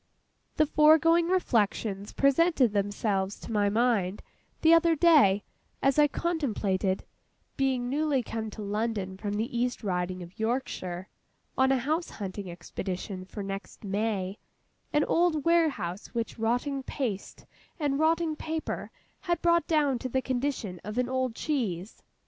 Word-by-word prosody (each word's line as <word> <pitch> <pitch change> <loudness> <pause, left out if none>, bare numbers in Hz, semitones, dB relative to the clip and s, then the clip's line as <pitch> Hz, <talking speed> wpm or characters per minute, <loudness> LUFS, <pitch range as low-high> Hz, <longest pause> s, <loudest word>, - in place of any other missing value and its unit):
The 310 - +4
foregoing 320 +3 +5
reflections 215 - 0
presented 275 -4 +3
themselves 200 -1 -1
to - - -8
my 205 -2 +2
mind, 210 -4 +1 0.4
the 325 +1 +7
other 335 0 +5
day, 285 - +5 0.4
as 275 +2 +2
I 295 - +7
contemplated 215 - -1 0.5
(being 260 -2 0
newly 285 -1 +1
come 220 -1 -4
to 215 0 -8
London 205 -2 -2
from 205 +1 -4
the 220 +3 -2
East 245 0 -1
Riding 180 -2 -2
of 175 +4 -14
Yorkshire, 205 -6 -2 0.5
on 265 0 +3
a 270 - +4
house 310 +7 -1
hunting 195 -1 -6
expedition 185 +2 -5
for 200 +2 -7
next 195 +1 -7
May), 200 -1 -2 0.5
an 295 -1 +3
old 330 -3 +2
warehouse 305 - +1
which 230 -1 -3
rotting 245 +5 0
paste 240 -7 -4 0.3
and 285 -2 0
rotting 320 0 +2
paper 320 +1 -4 0.3
had 345 -1 -1
brought 340 0 +3
down 290 -6 +2
to 255 - -4
the 260 +1 0
condition 245 -8 -2
of 210 +3 -6
an 250 0 +1
old 260 -2 -1
cheese. 215 - -3
240 Hz, 140 wpm, -28 LUFS, 200-300 Hz, 0.5 s, the